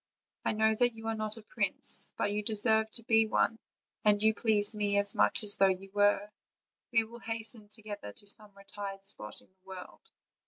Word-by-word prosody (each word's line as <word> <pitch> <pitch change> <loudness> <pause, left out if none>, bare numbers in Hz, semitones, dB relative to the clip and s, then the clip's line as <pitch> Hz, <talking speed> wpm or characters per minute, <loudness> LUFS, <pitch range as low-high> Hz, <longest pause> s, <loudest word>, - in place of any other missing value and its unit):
I - - 0
know 220 +1 +3
that 240 +1 +1
you 225 0 -10
are - - 0
not 215 0 -4
a 225 - -11
prince, - - 0
but 205 - 0
you 210 +1 -1
deserve 220 +1 +2
to 230 - -5
be 225 0 +4
one, 225 +1 +1 0.4
and 210 0 +3
you 220 0 +5
please 215 -1 +2
me 205 -1 0
as 200 0 0
much - - +2
as 205 -1 +1
though 195 - +5
you 190 +1 -2
were: 205 0 +3 0.6
we 230 -1 +4
will 235 +2 -11
hasten 225 -2 -3
together 210 - -8
to 205 - -19
some 205 +1 +1
retired 195 0 -8
spot 105 - -1
in - - -24
the 185 0 -42
world. 190 -1 -10
210 Hz, 200 wpm, -31 LUFS, 200-220 Hz, 0.6 s, you